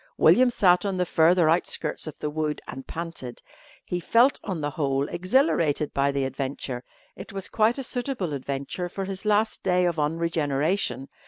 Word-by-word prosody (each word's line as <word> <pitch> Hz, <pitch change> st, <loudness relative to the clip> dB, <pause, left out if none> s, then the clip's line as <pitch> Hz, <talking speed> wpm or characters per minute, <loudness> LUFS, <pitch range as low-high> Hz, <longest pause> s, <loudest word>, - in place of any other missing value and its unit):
William 255 Hz, 0 st, +6 dB
sat 180 Hz, -6 st, +4 dB
on 195 Hz, -2 st, -2 dB
the 180 Hz, -, +1 dB
further 170 Hz, 0 st, +4 dB
outskirts 165 Hz, 0 st, 0 dB
of 155 Hz, -, -7 dB
the 150 Hz, -, -3 dB
wood 155 Hz, 0 st, -2 dB
and 135 Hz, +1 st, -8 dB
panted. 165 Hz, -7 st, -7 dB, 0.4 s
He 180 Hz, -, -2 dB
felt 235 Hz, +9 st, +3 dB
on 190 Hz, -5 st, -3 dB
the 145 Hz, 0 st, -2 dB
whole 140 Hz, -1 st, 0 dB
exhilarated 175 Hz, -, +1 dB
by 140 Hz, 0 st, +2 dB
the 140 Hz, -1 st, -1 dB
adventure. 130 Hz, -1 st, -4 dB, 0.3 s
It -, -, -9 dB
was 195 Hz, -1 st, -3 dB
quite 220 Hz, +3 st, +2 dB
a 270 Hz, -, -3 dB
suitable 245 Hz, -, -3 dB
adventure 140 Hz, +6 st, -4 dB
for 195 Hz, +2 st, -4 dB
his 195 Hz, +2 st, -6 dB
last 215 Hz, +1 st, +1 dB
day 180 Hz, -1 st, +2 dB
of 170 Hz, -2 st, 0 dB
unregeneration. 150 Hz, -, 0 dB
165 Hz, 170 wpm, -25 LUFS, 140-195 Hz, 0.4 s, William